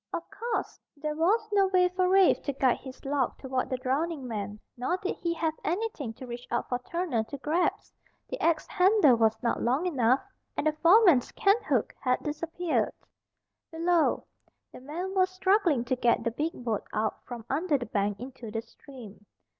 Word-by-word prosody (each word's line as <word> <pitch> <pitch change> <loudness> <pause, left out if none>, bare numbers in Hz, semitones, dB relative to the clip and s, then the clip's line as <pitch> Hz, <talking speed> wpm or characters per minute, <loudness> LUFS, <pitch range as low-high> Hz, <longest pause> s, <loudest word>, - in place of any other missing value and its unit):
Of 335 - -3
course, 455 +4 -3 0.2
there 300 +1 -3
was 410 +8 +2
no 395 -1 +4
way 365 -1 +4
for 365 0 +1
Rafe 380 -1 +5
to 280 - -1
guide 260 -2 +2
his 260 0 -11
log 275 -2 0
toward 260 -1 -2
the 255 - -1
drowning 275 +2 -2
man. 210 -2 -5 0.2
Nor 255 +9 -1
did 380 0 -3
he 340 - -2
have 320 -1 0
anything 350 - -2
to 255 - -10
reach 240 0 -8
out 240 - -1
for 245 - -1
Turner 315 -4 -2
to 280 - -7
grasp. 315 +6 -1 0.3
The - - -6
axe 330 -2 +2
handle 370 - +4
was 220 -1 +2
not 235 - 0
long 260 +9 +1
enough, 260 -6 +2 0.4
and - - -1
the 310 - +4
foreman's 335 - +5
canthook 395 - +1
had 255 -1 0
disappeared. 330 +3 -1 0.8
Below, 335 0 +1 0.5
the - - -12
men 340 +8 -5
were 375 -1 +3
struggling 370 - +2
to 255 - 0
get 240 -1 +2
the 230 - 0
big 305 +8 -2
boat 225 -4 -2
out 215 0 -2
from 235 -3 -7
under 300 +2 +1
the 245 - -5
bank 205 -2 -1
into 250 -2 -8
the 225 +1 -4
stream. 225 -4 -14
290 Hz, 180 wpm, -28 LUFS, 245-360 Hz, 0.8 s, Rafe